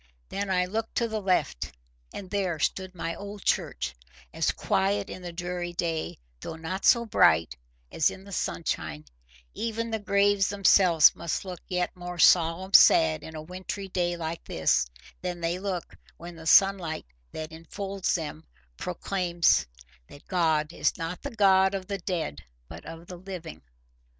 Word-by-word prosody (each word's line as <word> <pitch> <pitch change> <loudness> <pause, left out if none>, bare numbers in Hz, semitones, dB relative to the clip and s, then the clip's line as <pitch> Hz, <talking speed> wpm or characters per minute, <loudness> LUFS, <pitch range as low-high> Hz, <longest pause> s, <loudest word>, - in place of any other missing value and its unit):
Then 200 0 -3
I 180 -1 +2
looked 220 +4 -4
to 235 - +1
the 220 -1 -3
left, 180 - 0 0.4
and 195 - -7
there 185 -4 -1
stood 185 +5 -2
my 165 -1 -3
old 200 +3 -8
church, 65 +1 0 0.4
as - - +1
quiet 100 +1 0
in 185 - -8
the 175 -1 -6
dreary 175 0 -4
day, 165 -2 -2 0.2
though - - -6
not 165 +4 -4
so 235 -1 +5
bright, 80 - +4 0.4
as 160 - +3
in 190 - -10
the 200 - -12
sunshine: 80 - -3 0.5
even 230 0 -3
the 220 - -1
graves 200 -1 +2
themselves 185 -5 +5
must 170 +3 -3
look 180 -2 -6
yet 180 0 -1
more 180 0 -7
"solemn 175 +3 +4
sad" 80 -1 +7
in 160 - -9
a 155 - -6
wintry 185 +3 -6
day 175 -1 -1
like 165 0 -4
this, 65 -5 +1 0.3
than 180 -1 -4
they 170 +1 -1
look 185 -3 -4 0.2
when 175 0 -9
the 160 0 -9
sunlight 185 - +4 0.3
that 155 0 -6
infolds 195 +4 -3
them 160 -2 -5 0.3
proclaims 170 - +1 0.4
that 145 - -15
God 160 -3 +1
is - - 0
not 165 +1 -5
the 285 - -4
God 195 -4 +4
of 190 -1 -4
the 200 0 -4
dead 165 - -3 0.2
but - - -10
of 165 +1 -9
the 180 0 -9
living. 180 -3 -8
180 Hz, 160 wpm, -27 LUFS, 160-195 Hz, 0.5 s, sad